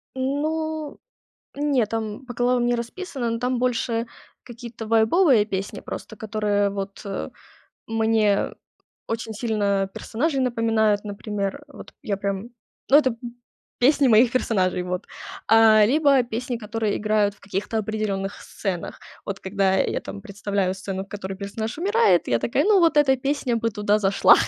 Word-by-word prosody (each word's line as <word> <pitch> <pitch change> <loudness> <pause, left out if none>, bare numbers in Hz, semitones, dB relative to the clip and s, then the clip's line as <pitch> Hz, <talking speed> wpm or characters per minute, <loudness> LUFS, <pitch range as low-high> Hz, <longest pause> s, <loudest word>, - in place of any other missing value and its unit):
Ну, 305 +3 -2 0.6
не, 280 -6 +1
там 220 +3 -4
по 245 - -7
главам 245 0 +2
не 240 - +2
расписано, 240 +1 -4
но 230 - -2
там 250 +1 -1
больше 235 -2 0 0.4
какие-то 235 -2 -9
вайбовые 225 - +4
песни 200 0 -4
просто, 220 - -8
которые 210 -1 0
вот, 195 0 -6
э, 195 -1 -4 0.6
мне 220 -2 +1 0.6
очень 225 0 -3
сильно 205 -3 0
персонажей 275 +4 -1
напоминают, 225 -4 +1
например. 205 +4 -4
Вот 290 - -12
я 210 -7 -2
прям, 200 +3 -3 0.4
ну, 280 - +8
это 260 -6 +1 0.6
песни 275 +1 +4
моих 230 +2 +5
персонажей 185 -8 +1
вот. 180 0 -4 0.4
А, 220 -1 +7
либо 275 0 +4
песни, 245 +1 -3
которые 220 -1 -2
играют 210 -1 +1
в 210 - -28
каких 200 +1 -4
то 225 - -1
определённых 205 -2 -3
сценах. 185 -4 -5 0.2
Вот 200 0 -4
когда 190 0 +1
я - - 0
там 95 0 -8
представляю 200 -1 -2
сцену, 190 0 -5
в - - -25
которой 195 -2 -6
персонаж 220 +5 -5
умирает, 435 +6 +3
я - - +2
такая, - - +1
ну 410 -2 +5
вот 330 -3 +3
эта 275 -3 +5
песня 265 -2 -1
бы 230 0 0
туда 210 0 +1
зашла. 195 -1 +5
225 Hz, 150 wpm, -23 LUFS, 200-250 Hz, 0.6 s, ну